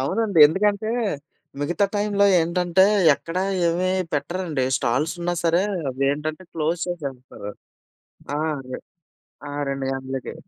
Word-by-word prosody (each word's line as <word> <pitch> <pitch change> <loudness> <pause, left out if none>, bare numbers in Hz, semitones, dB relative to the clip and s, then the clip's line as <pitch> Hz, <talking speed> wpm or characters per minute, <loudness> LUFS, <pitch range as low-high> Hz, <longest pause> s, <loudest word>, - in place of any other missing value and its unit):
అవునండి. 195 +6 0
ఎందుకంటే 205 +6 0 0.7
మిగతా 175 +7 +1
టైమ్‌లో 205 -1 +2
ఏంటంటే, 175 +2 +3 0.3
ఎక్కడ 165 +4 -8 0.3
ఏమి 180 +2 0 0.2
పెట్టరండి. 160 -3 -2
స్టాల్స్ 135 +7 0
ఉన్నా 175 +1 -1
సరే! 170 +3 +3 0.3
అవి 135 +2 -2
ఏంటంటే, 155 +4 -4
క్లోజ్ 165 +2 -1
చేసేస్తారు. 135 -10 -6 0.9
ఆ! - - -1 0.3
రే 125 - -4 0.7
ఆ! - - -7 0.2
2 135 -1 -3
గంటలకి. 130 0 -5
165 Hz, 115 wpm, -23 LUFS, 140-185 Hz, 0.9 s, ఏంటంటే